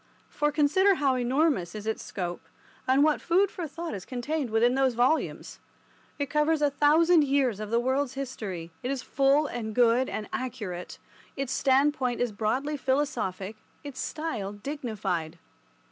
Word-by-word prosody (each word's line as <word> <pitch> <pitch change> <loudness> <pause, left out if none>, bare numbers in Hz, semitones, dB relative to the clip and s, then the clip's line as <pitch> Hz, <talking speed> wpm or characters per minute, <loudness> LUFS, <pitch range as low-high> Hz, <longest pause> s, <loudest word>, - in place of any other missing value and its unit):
For 295 0 0
consider 320 +7 +4
how 280 -5 +2
enormous 255 - +1
is 210 0 -6
its 220 0 -2
scope, 175 -2 -4 0.5
and 265 +2 +4
what 305 -1 +2
food 375 +3 +2
for 345 -4 -5
thought 335 +1 -6
is 195 -3 -5
contained 265 +3 -3
within 225 +3 +3
those 265 -2 +2
volumes. 255 +7 0 0.6
It 285 - 0
covers 300 +2 +2
a 290 - +3
thousand 310 +4 +5
years 270 -6 +1
of 215 -1 -5
the 230 +1 +2
world's 260 +2 0
history, 205 -11 -5
it 250 - -3
is 270 -2 -2
full 275 +2 +3
and 225 -6 -4
good 245 +1 +4
and 210 -1 -4
accurate, 215 -9 -5 0.4
its 275 -2 -2
standpoint 265 -2 +2
is 245 -2 0
broadly 255 +8 -1
philosophic, 240 -8 -1 0.3
its 280 -3 -8
style 250 -8 -3
dignified. 205 - -4
260 Hz, 155 wpm, -27 LUFS, 220-290 Hz, 0.6 s, thousand